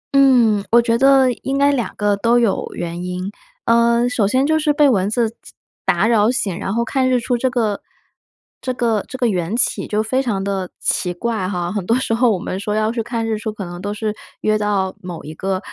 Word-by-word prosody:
嗯， 240 -7 +5
我 235 - +7
觉 230 -1 +2
得 265 0 +5
应 270 +1 -2
该 280 +1 +4
两 245 -5 -2
个 205 -1 +1
都 230 +4 +3
有 230 -5 +1
原 175 +1 -4
因， 180 +2 -4 0.3
呃， 235 +1 +3
首 230 -5 +1
先 260 +5 +2
就 315 +1 +2
是 300 -1 +2
被 295 -1 +4
蚊 200 -5 +2
子 230 0 0 0.5
打 - - +2
扰 220 -2 +3
醒， 215 -8 -1
然 195 - -3
后 235 +2 0
看 260 +1 +1
日 250 - +3
出 245 +1 -1
这 255 +2 0
个， 220 -5 -1 0.8
这 255 - -2
个 230 -4 0
这 260 - -7
个 245 - +1
缘 185 0 -1
起 - - 0
就 215 +1 0
非 260 +4 0
常 205 -7 -2
地 195 -2 -2
奇 180 - 0
怪 220 -2 -2
哈。 175 -2 -2
很 205 -3 -2
多 230 - +3
时 260 -3 -1
候 240 +2 +3
我 195 - +1
们 185 +2 -4
说 210 +1 -2
要 215 0 +1
去 235 0 -2
看 230 0 -3
日 220 -1 -1
出， 220 0 -3
可 205 -3 -7
能 175 +1 -8
都 205 - -3
是 210 0 -2 0.3
约 215 0 +2
到 200 -3 0
某 180 -2 -7
一 155 - -8
个， 190 +3 -2
225 Hz, 245 characters per minute, -19 LUFS, 195-245 Hz, 0.8 s, 我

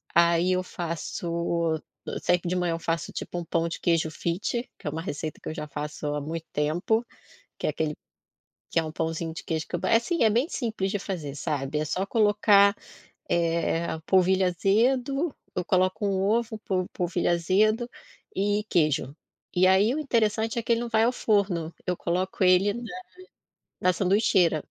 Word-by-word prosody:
aí 170 +1 +4
eu 185 - +1
faço 170 -1 -2 0.2
eu - - -4
sei 180 - +3
que 175 - -6
de 180 - 0
manhã 180 -2 0
eu 165 - -3
faço, 165 0 -2
tipo, 175 - -5
um 170 - -6
pão 165 +1 0
de 165 - -5
queijo 165 -2 +1
fit, 190 +10 -2
que - - -20
é - - +2
uma 160 - -4
receita 155 -2 -5
que - - -5
eu 155 - -5
já 150 - -5
faço 150 +1 -5
há - - -1
muito 160 +2 -5
tempo. 175 +10 +1 0.6
Que - - -2
é - - +2
aquele 150 0 -2 0.8
que - - +1
é 160 - +2
um 155 - -5
pãozinho 165 0 -2
de - - -7
queijo 160 -1 -2
que - - -10
eu - - -6
é 225 - +5
assim, 325 +8 0
é 220 - +6
bem 240 +7 +2
simples 220 -6 -2
de 205 - -1
fazer, 165 -8 -5
sabe. 145 0 -2
É 155 - 0
só 185 +5 -1
colocar, 205 -2 +4 0.5
eh, 170 0 +1 0.2
polvilho 190 0 +4
azedo 255 - +1 0.2
eu 180 - -1
coloco 185 +3 +1
1 190 -1 0
ovo, 220 +2 +1
po 185 -2 0
polvilho 175 0 0
azedo 210 +7 +2 0.5
e 205 +2 +1
queijo. 150 -4 +1 0.4
E 180 +1 +4
aí 195 +6 +4
o - - -2
interessante 225 -5 +1
é 235 - -1
que 235 - +1
ele 230 - +2
não 240 - -3
vai 225 -1 +3
ao 245 - +3
forno, 195 -8 0
eu 180 - +1
coloco 185 +3 -2
ele 185 +3 +5
na 240 - -6 1.0
na 185 - +4
sanduicheira. 190 -3 +3
180 Hz, 190 wpm, -26 LUFS, 165-210 Hz, 1.0 s, é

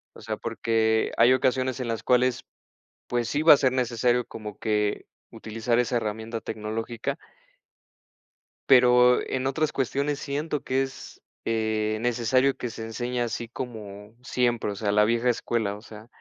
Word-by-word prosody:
O - - -12
sea, - - -4
porque 110 -1 0
hay 120 +2 +6
ocasiones 130 0 +1
en 125 - -3
las 115 -1 -3
cuales 125 0 +2 0.6
pues 120 -1 -1
sí 145 +1 -1
va 160 - +9
a - - +5
ser 130 -2 +2
necesario 125 -1 +1
como 105 -2 -8
que, 105 -2 -1 0.3
utilizar 115 +1 -2
esa 125 0 +1
herramienta 110 +1 -4
tecnológica. 110 +2 -4 1.5
Pero 125 -1 +6
en 130 0 -1
otras 155 +3 0
cuestiones 140 +2 -1
siento 145 +1 -3
que 130 +1 0
es, 135 0 -8 0.2
eh, 110 -1 0
necesario 120 +3 +2
que 120 - -4
se 110 - -7
enseñe 120 +2 -3
así 120 0 -3
como 110 -4 -8
siempre. 120 -4 0
O 100 - -5
sea, 100 0 -1
la 105 +1 +5
vieja 115 +3 +1
escuela, 115 -3 0
o 105 - -11
sea 110 -1 -12
120 Hz, 155 wpm, -26 LUFS, 110-130 Hz, 1.5 s, va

